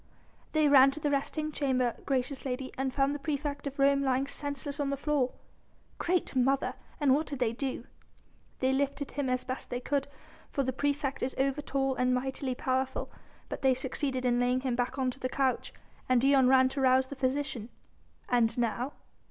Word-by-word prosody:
"They 310 Hz, -1 st, +4 dB
ran 275 Hz, -1 st, +8 dB
to 275 Hz, +3 st, -5 dB
the 295 Hz, -1 st, 0 dB
resting 305 Hz, +2 st, -1 dB
chamber, 255 Hz, -5 st, 0 dB
gracious 265 Hz, 0 st, -1 dB
lady, 260 Hz, 0 st, -3 dB
and 265 Hz, 0 st, -1 dB
found 275 Hz, +1 st, +1 dB
the 290 Hz, -, -4 dB
praefect 285 Hz, 0 st, -3 dB
of 280 Hz, +1 st, -6 dB
Rome 275 Hz, 0 st, +4 dB
lying 265 Hz, 0 st, +1 dB
senseless 285 Hz, +1 st, -4 dB
on 285 Hz, -1 st, 0 dB
the 280 Hz, -, -1 dB
floor." 280 Hz, -3 st, +1 dB, 0.7 s
"Great 355 Hz, -4 st, 0 dB
Mother!... 265 Hz, +2 st, +2 dB, 0.3 s
and 285 Hz, -3 st, +4 dB
what 305 Hz, +3 st, +1 dB
did 285 Hz, -, -4 dB
they 240 Hz, -3 st, +1 dB
do?" 265 Hz, +2 st, -4 dB, 0.8 s
"They 260 Hz, 0 st, +3 dB
lifted 280 Hz, +1 st, -1 dB
him 280 Hz, -2 st, -2 dB
as 255 Hz, 0 st, 0 dB
best 255 Hz, 0 st, -5 dB
they 245 Hz, -, -2 dB
could; 280 Hz, +2 st, -1 dB, 0.4 s
for 275 Hz, -, 0 dB
the 260 Hz, 0 st, -1 dB
praefect 285 Hz, +1 st, -1 dB
is 260 Hz, -, -2 dB
over 275 Hz, +2 st, +1 dB
tall 270 Hz, -2 st, 0 dB
and 250 Hz, 0 st, +2 dB
mightily 260 Hz, 0 st, -2 dB
powerful. 260 Hz, +1 st, -1 dB, 0.4 s
But -, -, -6 dB
they 265 Hz, -1 st, +4 dB
succeeded 260 Hz, 0 st, -2 dB
in 245 Hz, -1 st, +3 dB
laying 250 Hz, +1 st, +2 dB
him 255 Hz, -2 st, -1 dB
back 245 Hz, +2 st, -1 dB
on 260 Hz, -1 st, +1 dB
to 270 Hz, -, -12 dB
the 255 Hz, -, -2 dB
couch, 265 Hz, -1 st, 0 dB, 0.4 s
and 255 Hz, -1 st, +5 dB
Dion 270 Hz, 0 st, +5 dB
ran 260 Hz, 0 st, +6 dB
to 270 Hz, +1 st, -3 dB
rouse 260 Hz, 0 st, +4 dB
the 280 Hz, -, -8 dB
physician." 260 Hz, -3 st, -1 dB, 0.6 s
"And 235 Hz, -2 st, +2 dB
now?" 240 Hz, +3 st, -1 dB
265 Hz, 195 wpm, -30 LUFS, 255-280 Hz, 0.8 s, ran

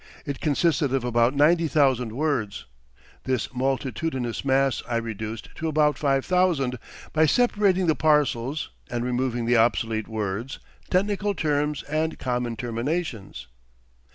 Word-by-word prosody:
It 140 Hz, -2 st, -4 dB
consisted 150 Hz, -2 st, +1 dB
of 135 Hz, -, -1 dB
about 120 Hz, +2 st, +2 dB
ninety 165 Hz, +3 st, +4 dB
thousand 130 Hz, -6 st, +2 dB
words. 130 Hz, -7 st, -1 dB, 0.6 s
This 125 Hz, -3 st, -1 dB
multitudinous 130 Hz, 0 st, -2 dB
mass 135 Hz, -1 st, +2 dB
I 120 Hz, -, -1 dB
reduced 110 Hz, -1 st, -5 dB
to 160 Hz, -, -2 dB
about 150 Hz, -2 st, +2 dB
five 135 Hz, -1 st, +1 dB
thousand, 165 Hz, -9 st, +1 dB, 0.3 s
by 155 Hz, 0 st, +4 dB
separating 200 Hz, -, +3 dB
the 160 Hz, -, +3 dB
parcels, 145 Hz, -2 st, +1 dB, 0.2 s
and 120 Hz, 0 st, -2 dB
removing 125 Hz, -1 st, -1 dB
the 120 Hz, +1 st, +3 dB
obsolete 115 Hz, -1 st, +1 dB
words, 110 Hz, +3 st, -3 dB, 0.3 s
technical 200 Hz, +2 st, +1 dB
terms, 150 Hz, -2 st, 0 dB
and 155 Hz, +2 st, -2 dB
common 125 Hz, -2 st, -2 dB
terminations." 115 Hz, -, -3 dB
135 Hz, 125 wpm, -25 LUFS, 120-155 Hz, 0.6 s, ninety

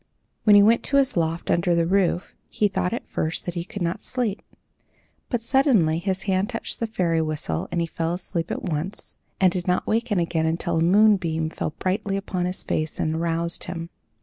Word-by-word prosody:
When 210 Hz, -2 st, +7 dB
he 205 Hz, -, +8 dB
went 230 Hz, +3 st, +4 dB
to 280 Hz, -, +3 dB
his 275 Hz, -2 st, +3 dB
loft 165 Hz, -1 st, -1 dB
under 175 Hz, 0 st, +2 dB
the 170 Hz, 0 st, +2 dB
roof, 185 Hz, 0 st, +1 dB, 0.2 s
he 210 Hz, -, +1 dB
thought 190 Hz, -2 st, -1 dB
at 235 Hz, -, -4 dB
first 160 Hz, +2 st, -2 dB
that 175 Hz, -, -3 dB
he 170 Hz, -1 st, -3 dB
could 190 Hz, +1 st, -5 dB
not 170 Hz, +1 st, -2 dB
sleep; 235 Hz, -5 st, -2 dB, 0.9 s
but 240 Hz, -3 st, -1 dB
suddenly 230 Hz, -, +3 dB
his 190 Hz, +1 st, -2 dB
hand 190 Hz, +1 st, 0 dB
touched 230 Hz, -2 st, -3 dB
the 230 Hz, -, -1 dB
fairy 170 Hz, -7 st, 0 dB
whistle 150 Hz, -, -2 dB
and 175 Hz, -, 0 dB
he -, -, +1 dB
fell 165 Hz, +1 st, -2 dB
asleep 175 Hz, -2 st, -4 dB
at -, -, -4 dB
once, 170 Hz, +3 st, -4 dB, 0.2 s
and 185 Hz, -2 st, +5 dB
did 175 Hz, 0 st, -3 dB
not 180 Hz, 0 st, +1 dB
waken 225 Hz, -1 st, 0 dB
again 165 Hz, -2 st, 0 dB
until 170 Hz, +1 st, -1 dB
a -, -, +2 dB
moonbeam 175 Hz, -4 st, +3 dB
fell 155 Hz, -, -4 dB
brightly 195 Hz, +1 st, -1 dB
upon 185 Hz, -2 st, -2 dB
his 180 Hz, +1 st, -3 dB
face 155 Hz, 0 st, -2 dB
and 155 Hz, -, 0 dB
aroused 170 Hz, +1 st, -1 dB
him. 170 Hz, -1 st, -6 dB
180 Hz, 200 wpm, -24 LUFS, 165-205 Hz, 0.9 s, he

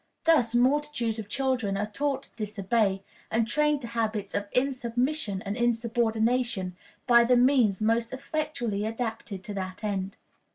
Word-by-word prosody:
Thus 260 Hz, -8 st, +3 dB
multitudes 255 Hz, -3 st, +1 dB
of 210 Hz, -2 st, -7 dB
children 255 Hz, -7 st, 0 dB
are 205 Hz, -, 0 dB
taught 275 Hz, +6 st, -2 dB
to -, -, -19 dB
disobey, 205 Hz, -2 st, 0 dB, 0.3 s
and 225 Hz, 0 st, +1 dB
trained 300 Hz, +2 st, +2 dB
to 235 Hz, -, -6 dB
habits 220 Hz, -3 st, -2 dB
of 205 Hz, 0 st, -2 dB
insubmission 250 Hz, -3 st, -1 dB
and 200 Hz, +1 st, -2 dB
insubordination, 235 Hz, -3 st, 0 dB, 0.3 s
by 235 Hz, -2 st, +6 dB
the 245 Hz, +1 st, +4 dB
means 245 Hz, -6 st, +3 dB
most 230 Hz, +1 st, +1 dB
effectually 260 Hz, -6 st, -2 dB
adapted 225 Hz, -3 st, -4 dB
to 205 Hz, -, -6 dB
that 185 Hz, +1 st, -5 dB
end. 195 Hz, -1 st, -2 dB
230 Hz, 140 wpm, -27 LUFS, 210-255 Hz, 0.3 s, by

